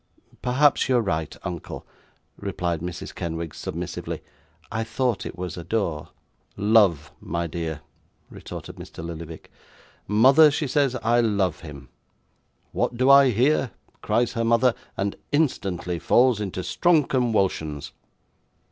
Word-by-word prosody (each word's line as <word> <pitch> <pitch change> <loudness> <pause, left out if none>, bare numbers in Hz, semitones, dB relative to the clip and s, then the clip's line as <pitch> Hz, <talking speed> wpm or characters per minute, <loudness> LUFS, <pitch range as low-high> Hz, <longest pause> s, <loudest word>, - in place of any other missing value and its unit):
'Perhaps 135 +3 +3
you 130 - +4
are - - +3
right, 80 -6 -2
uncle,' 85 -3 -6 0.5
replied 90 -4 -3
Mrs. 90 0 -6
Kenwigs, 80 -2 -5
submissively. - - -5 0.5
'I 110 +2 -1
thought 115 0 -1
it - - -9
was 90 -1 -5
"adore."' 85 -3 -2 0.5
'"Love," 100 -9 +3
my 85 0 -2
dear,' 80 -2 -4 0.5
retorted - - -9
Mr. 80 - -9
Lillyvick. 85 -1 -8 0.6
'"Mother," 135 +9 +6
she 145 +1 -1
says, 135 -1 +1
"I 120 +2 +3
love 100 -7 0
him!" 70 -5 -11 0.8
"What 120 - -1
do 130 +2 +5
I 140 -1 +8
hear?" 125 0 +2 0.3
cries 120 +1 +1
her 115 -1 -1
mother; 115 +2 +3 0.2
and 100 0 -1 0.2
instantly 95 - 0
falls 120 +1 +3
into 95 -2 -4
strong 165 - +3
conwulsions. 95 - 0
105 Hz, 125 wpm, -24 LUFS, 85-125 Hz, 0.8 s, I